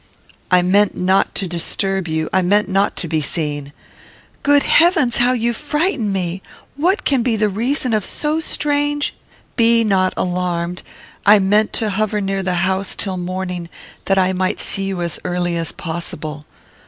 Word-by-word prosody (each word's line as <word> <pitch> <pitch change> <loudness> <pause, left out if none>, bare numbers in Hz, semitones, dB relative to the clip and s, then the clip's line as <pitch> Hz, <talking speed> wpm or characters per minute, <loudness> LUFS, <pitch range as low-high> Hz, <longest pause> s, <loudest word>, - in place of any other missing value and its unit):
"I 180 -1 +4
meant 200 +3 +2
not 190 +2 +1
to 195 - -1
disturb 190 +2 -2
you; 160 0 -1
I 190 - +3
meant 205 +4 +2
not 195 +1 +1
to 170 - -3
be 155 -1 0
seen." 145 -2 -3 0.7
"Good 285 0 +4
heavens! 330 -8 +4
How 245 +1 +3
you 235 -1 0
frighten 295 - -1
me! 185 -1 -2 0.3
What 355 +8 0
can 270 -4 +2
be 235 -1 +1
the 215 -1 +1
reason 240 +4 -1
of 215 -2 +1
so 305 +8 -1
strange 290 -2 0 0.2
" - - -33
"Be 230 -1 +4
not 190 -3 +1
alarmed. 180 -1 -2 0.4
I 210 +1 +7
meant 205 +2 +2
to 220 -2 0
hover 215 +1 0
near 195 -1 -1
the 185 -1 -1
house 190 +1 -1
till 190 -2 -2
morning, 180 -1 -4 0.4
that 195 - +2
I 190 0 +3
might 185 0 -1
see 195 -1 +1
you 190 -3 -3
as 170 -2 -3
early 175 -1 -1
as 165 -1 -1
possible." 160 -3 -5
195 Hz, 170 wpm, -18 LUFS, 180-230 Hz, 0.7 s, I